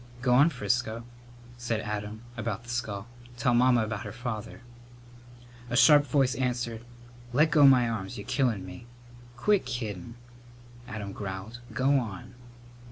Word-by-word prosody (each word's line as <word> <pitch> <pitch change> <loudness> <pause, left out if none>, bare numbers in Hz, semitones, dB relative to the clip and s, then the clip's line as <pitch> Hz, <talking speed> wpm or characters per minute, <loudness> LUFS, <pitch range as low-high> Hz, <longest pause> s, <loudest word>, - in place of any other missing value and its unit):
"Go 125 -1 +3
on, 140 +6 +6
Frisco," 115 -2 -2 0.5
said 120 -2 -1
Adam, 105 +1 -5
about 115 -1 -4
the 120 - -14
skull, 110 -4 -3 0.3
"tell 120 +1 +2
Mamma 120 -1 +4
about 110 -1 -4
her - - -6
father." 120 -2 -6 1.1
A 120 - 0
sharp 145 +1 +7
voice 130 -1 +2
answered, 120 -3 -2 0.5
"Let 155 +5 +4
go 145 -3 +7
my 125 -3 +6
arms. 105 -4 -4
You're 100 - -7
killin' 115 -9 0
me!" 90 +5 -10 0.5
"Quit 205 +10 +2
kiddin'," 115 -4 -5 0.7
Adam 105 -3 -6
growled. 100 +4 -6
"Go 135 +2 +3
on!" 120 +1 -7
120 Hz, 140 wpm, -28 LUFS, 105-125 Hz, 1.1 s, sharp